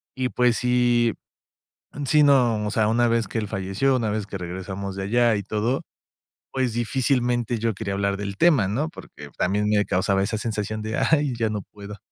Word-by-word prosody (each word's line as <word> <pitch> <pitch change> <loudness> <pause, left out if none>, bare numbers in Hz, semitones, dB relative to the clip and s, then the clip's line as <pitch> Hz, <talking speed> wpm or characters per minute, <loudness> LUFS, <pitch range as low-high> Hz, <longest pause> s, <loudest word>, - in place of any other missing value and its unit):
Y 130 -1 -1
pues 125 +2 +2
si 120 -1 +2 0.9
Sí, 150 +1 +5
no. 120 -7 +3
O 105 - -2
sea, 110 -2 +2
una 120 +2 +2
vez 115 0 +1
que - - -5
él 105 - -1
falleció, 100 +7 0
una 115 -4 -1
vez 105 -1 -2
que 100 -2 -7
regresamos 95 +2 -5
de 95 - -4
allá 120 +2 +3
y 100 - -3
todo, 110 +6 -1 0.7
pues, 130 -3 0
difícilmente 120 -1 0
yo 115 -1 0
quería 100 -1 -4
hablar 100 0 0
del 100 0 -5
tema, 145 - +4
¿no? 135 +10 -1
Porque - - -11
también 105 +3 +1
me 105 -1 +3
causaba 95 +1 +1
esa 110 +2 -2
sensación 110 -1 -3
de: 110 +1 -3
"¡ay! 145 -5 +2
Ya 110 -1 0
no 105 -2 -3
puedo". 105 0 -11
110 Hz, 195 wpm, -24 LUFS, 100-120 Hz, 0.9 s, Sí